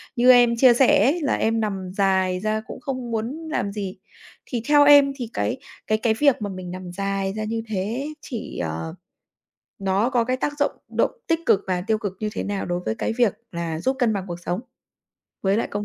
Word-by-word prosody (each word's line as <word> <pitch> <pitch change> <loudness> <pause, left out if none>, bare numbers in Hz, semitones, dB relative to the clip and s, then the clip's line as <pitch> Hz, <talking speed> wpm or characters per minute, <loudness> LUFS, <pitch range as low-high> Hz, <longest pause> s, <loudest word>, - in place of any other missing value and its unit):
như 250 +1 +6
em 240 -1 +6
chia 250 0 +7
sẻ 245 -3 +5
ấy 295 +9 +2
là 280 - +1
em 225 +1 +1
nằm 195 -4 -3
dài 190 -2 +2
ra 215 +2 -1
cũng - - -8
không 255 -3 -4
muốn 250 +9 -3
làm 200 -9 -1
gì. 200 -2 -5 0.5
Thì 240 -3 -3
theo 290 -1 +6
em 285 -1 +7
thì 245 -4 -5
cái 245 - -1 0.3
cái 215 - +2
cái 220 0 +1
việc 280 -6 +4
mà 205 - -2
mình 185 -2 -7
nằm 185 -1 -7
dài 195 +1 -2
ra 215 - -3
như 225 +1 -2
thế 220 +7 -2
chỉ, 235 -6 -6
ờ 80 0 -4 0.8
nó 195 +4 +1
có 245 -3 +2
cái 255 +1 0
tác 290 - -1
dụng 285 - +2 0.2
động - - +1 0.2
tích 330 -1 +2
cực 195 - +4
và 180 -1 0
tiêu 220 - +2
cực 205 -3 -4
như 215 - -2
thế - - -3
nào 200 -1 -3
đối 175 0 -2
với 110 - -1
cái - - -2
việc 235 -5 +3 0.2
là 170 -2 -3
giúp 265 +6 +1
cân 235 -3 +3
bằng 195 -2 -3
cuộc 175 -1 -6
sống 175 +1 -3 0.8
với 195 +1 +2
lại - - -1
công 205 0 -3
215 Hz, 225 wpm, -23 LUFS, 190-250 Hz, 0.8 s, chia